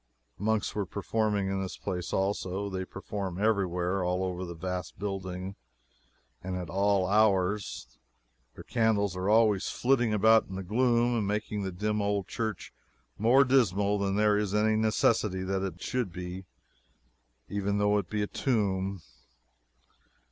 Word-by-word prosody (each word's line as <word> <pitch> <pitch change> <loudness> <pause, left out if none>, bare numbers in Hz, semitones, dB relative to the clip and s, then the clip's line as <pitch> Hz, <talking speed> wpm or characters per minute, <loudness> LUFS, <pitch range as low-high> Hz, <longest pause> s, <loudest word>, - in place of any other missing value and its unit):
Monks 110 +1 0
were 100 -3 -2
performing 105 +1 -1
in 95 0 -1
this 95 - -5
place 90 -3 -4
also. 95 0 -1
They 95 0 -3
perform 95 -1 -5
everywhere 95 -3 +1
all 90 +1 0
over 90 -1 -3
the 85 -1 -6
vast 90 +2 -5
building, 95 -1 -4 0.9
and 95 0 -3
at 90 -4 -6
all 100 0 +2
hours. 100 -1 +1 0.6
Their - - -10
candles 105 -4 +1
are 90 +2 -1
always 105 -3 +3
flitting 120 -3 +2
about 110 +2 +4
in 95 - -7
the 95 - -4
gloom, 120 +4 +2
and 110 -4 0
making 105 0 -2
the 95 -1 -3
dim 105 +3 -1
old 100 -2 -1
church 110 -5 -4 0.5
more 120 +6 +6
dismal 105 -6 +2
than 100 -1 0
there 105 0 +3
is 105 -1 -1
any 110 +1 +3
necessity 110 -3 +1
that 95 0 -1
it 90 -2 -5
should 125 -7 -1
be, 90 +1 -7 1.0
even 100 0 -1
though 105 0 +3
it 90 - -7
is 105 -1 0
a - - +1
tomb. 100 - -1
100 Hz, 150 wpm, -29 LUFS, 95-105 Hz, 1.0 s, more